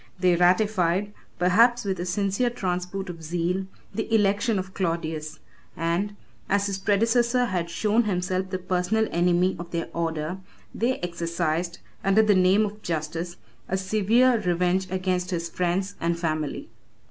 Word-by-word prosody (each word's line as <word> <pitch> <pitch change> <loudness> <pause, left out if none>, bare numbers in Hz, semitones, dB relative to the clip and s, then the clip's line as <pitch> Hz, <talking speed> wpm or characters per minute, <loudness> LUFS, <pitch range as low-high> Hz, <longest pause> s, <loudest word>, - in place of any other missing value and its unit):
They 180 -1 +4
ratified, 185 +1 +2 0.2
perhaps 230 +7 +4
with 190 -2 -1
a 175 - -3
sincere 200 +6 +1
transport 190 -3 -3
of 170 -2 -7
zeal, 175 +4 -1 0.3
the 225 - -3
election 210 +1 +2
of 190 0 -4
Claudius; 160 -4 -2 0.4
and, 170 +5 -1 0.3
as 200 0 +2
his 195 -1 -2
predecessor 235 +5 +2
had 180 -6 -2
shown 215 +5 +1
himself 185 -1 -1
the 185 - -2
personal 185 +4 0
enemy 180 +2 +2
of 170 0 -7
their 170 -1 -3
order, 165 +1 -2 0.3
they 245 +3 0
exercised, 170 0 -2 0.3
under 195 +3 +4
the 210 -1 +4
name 190 +3 +4
of 210 +1 -7
justice, 165 +1 -3 0.3
a 190 - +1
severe 220 +6 +3
revenge 180 +1 +1
against 185 -1 -1
his 170 -2 -2
friends 180 +3 -1
and 170 0 0
family. 155 -3 -3
185 Hz, 145 wpm, -25 LUFS, 170-205 Hz, 0.4 s, They